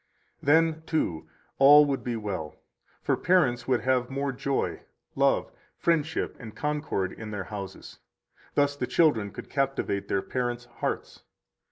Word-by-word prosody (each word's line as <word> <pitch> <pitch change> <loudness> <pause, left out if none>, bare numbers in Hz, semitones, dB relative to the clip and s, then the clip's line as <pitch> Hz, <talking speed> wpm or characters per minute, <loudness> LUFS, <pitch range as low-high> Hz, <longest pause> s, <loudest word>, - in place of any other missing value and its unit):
Then, 160 +2 +3
too, 85 - -1 0.3
all 145 +2 +9
would 140 -2 -2
be 120 -1 -2
well; 100 -8 -4 0.5
for - - +2
parents 130 -10 +2
would 125 -2 +2
have 130 -2 +1
more 140 +1 -1
joy, 135 +1 -2 0.3
love, - - +2 0.3
friendship, 160 -2 0
and 115 -4 -9
concord 150 -11 -1
in 110 -1 -8
their 105 -2 -4
houses; 95 -1 -8 0.6
thus 145 0 +2
the 125 -3 -3
children 130 -12 +3
could - - -9
captivate 135 -8 -1
their 95 - 0
parents' 120 -1 -2
hearts. - - -3
130 Hz, 140 wpm, -27 LUFS, 110-145 Hz, 0.6 s, all